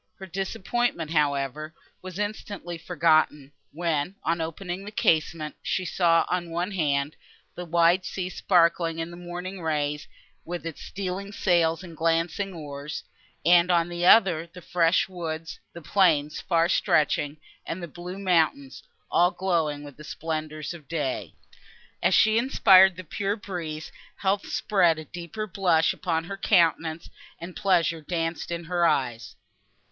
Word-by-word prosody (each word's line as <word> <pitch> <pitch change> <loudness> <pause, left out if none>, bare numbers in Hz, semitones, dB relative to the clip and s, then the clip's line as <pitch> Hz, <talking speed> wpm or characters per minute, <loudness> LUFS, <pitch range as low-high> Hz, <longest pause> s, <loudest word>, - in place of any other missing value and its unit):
Her 190 - -8
disappointment, 190 -1 -2
however, 150 0 0 0.3
was 185 -1 -8
instantly 205 -4 -5
forgotten, 155 -4 +2 0.2
when, 165 +2 -1
on 165 0 0
opening 175 +3 -5
the 205 - -7
casement, 155 -5 +1
she 185 - -2
saw, 170 -2 +3
on 175 -1 -2
one 175 +4 -2
hand, 145 -5 0 0.4
the 180 - -7
wide 170 +2 +3
sea 185 -1 -4
sparkling 170 -3 +2
in 165 +1 -4
the - - -9
morning 175 +2 -7
rays, 150 -2 -1 0.4
with 175 -1 -6
its 165 -2 -6
stealing 195 +1 -5
sails 170 -4 +1
and 170 -3 -10
glancing 165 +4 0
oars; 150 -3 -7 0.4
and, 175 +1 +6
on 170 -1 +3
the 175 0 -4
other, 180 -5 +5
the 180 - -11
fresh 170 0 +2
woods, 165 -3 -6
the 170 - -10
plains 155 -6 +2
far 165 0 +2
stretching 150 -3 +1 0.3
and 175 +2 -5
the - - -4
blue 175 +4 -8
mountains, 160 -8 +1 0.3
all 175 +1 +4
glowing 170 -5 -1
with 145 -2 -11
the 150 - -11
splendour 155 0 -5
of 155 -5 -12
day. 145 -5 -3 0.7
As - - +3
she 220 +1 +5
inspired 190 -7 +6
the 185 - -8
pure 195 +5 -2
breeze, 175 -7 -6 0.2
health 200 +1 -1
spread 175 -6 +2
a 155 - -7
deeper 175 +6 -6
blush 180 -5 +2
upon 165 -3 -1
her 195 +4 -6
countenance, 165 -4 +2 0.3
and 175 +1 -8
pleasure 170 -5 +1
danced 165 +1 -3
in 170 0 -4
her 175 0 +1
eyes. 120 -6 -1
170 Hz, 145 wpm, -26 LUFS, 160-185 Hz, 0.7 s, and